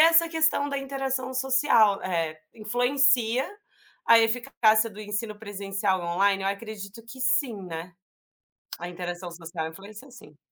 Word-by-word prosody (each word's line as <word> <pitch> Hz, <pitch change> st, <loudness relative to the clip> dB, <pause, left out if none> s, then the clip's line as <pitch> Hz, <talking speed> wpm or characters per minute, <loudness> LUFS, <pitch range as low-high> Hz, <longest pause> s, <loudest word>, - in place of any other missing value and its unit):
essa, 330 Hz, +1 st, +6 dB
questão 320 Hz, -3 st, +1 dB
da 280 Hz, -, -3 dB
interação 270 Hz, -1 st, -3 dB
social, 260 Hz, -6 st, +3 dB
eh, 165 Hz, -4 st, -2 dB, 0.2 s
influencia 245 Hz, +2 st, +2 dB, 0.6 s
a 230 Hz, 0 st, +8 dB
eficácia 225 Hz, -1 st, +2 dB
do 210 Hz, +1 st, -11 dB
ensino 210 Hz, +1 st, -4 dB
presencial 200 Hz, -2 st, -2 dB
do 170 Hz, -, -5 dB
online? 195 Hz, +3 st, +2 dB
Eu 195 Hz, -, 0 dB
acredito 200 Hz, +1 st, -6 dB
que 260 Hz, +3 st, -10 dB
sim, 255 Hz, -4 st, +1 dB
né? 170 Hz, 0 st, -7 dB, 0.8 s
A 175 Hz, -, -6 dB
interação 175 Hz, 0 st, -6 dB
social 170 Hz, -1 st, -6 dB
influencia, 205 Hz, +9 st, -12 dB
sim. 150 Hz, -12 st, -15 dB
215 Hz, 135 wpm, -26 LUFS, 190-260 Hz, 0.8 s, a